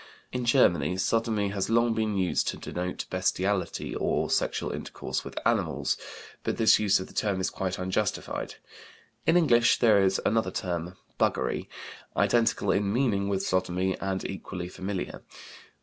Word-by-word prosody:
In 125 -1 -2
Germany 105 -7 +3
"sodomy" 110 0 +1
has 100 0 -2
long 115 0 +3
been 110 -2 -1
used 95 -2 +1
to - - -1
denote 90 +1 -4
bestiality, 95 +1 -1
or - - 0
sexual - - 0
intercourse - - -4
with - - -9
animals, - - +1 0.5
but - - -2
this 110 - +5
use 100 -3 +3
of 95 - -5
the - - -15
term 100 -3 0
is 95 - -1
quite 95 -1 -3
unjustified. 95 +2 -2 0.7
In 165 - +5
English 120 -9 +4
there 110 -4 +5
is 95 0 +2
another 115 +1 +2
term, 90 -1 -3 0.2
"buggery," - - 0 0.5
identical 120 -1 +2
in 100 0 +1
meaning 105 -5 +1
with 95 -1 -1
sodomy, 95 0 0
and 95 -1 -2
equally 90 -2 -6
familiar. 95 0 -5
100 Hz, 150 wpm, -28 LUFS, 95-110 Hz, 0.7 s, this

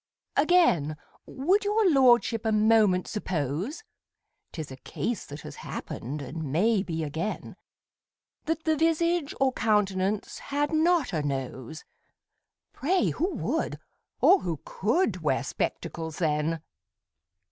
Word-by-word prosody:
Again, 280 - +3 0.3
would 365 +11 +1
your 415 0 +2
lordship 245 - +4
a 220 - +1
moment 215 -4 +4
suppose 185 - -3 0.7
('Tis 155 -5 -6
a 130 - -8
case 230 - -4
that 145 +1 -8
has - - -9
happened, 140 +5 -6
and 145 +2 -5
may 205 +7 +3
be 165 -4 -3
again) 160 +8 -4 0.9
That 320 0 -1
the 315 -1 +2
visage 330 0 +1
or 265 -1 +3
countenance 205 -2 0
had 290 +2 -2
not 315 - +2
a 155 - 0
nose, 135 0 -4 0.9
Pray 360 +6 +1
who 360 +5 -1
would, - - -2 0.4
or 385 - +7
who 165 -5 -3
could, 275 - 0
wear - - +1
spectacles 160 -2 -4
then! 155 0 0
215 Hz, 120 wpm, -27 LUFS, -, 0.9 s, or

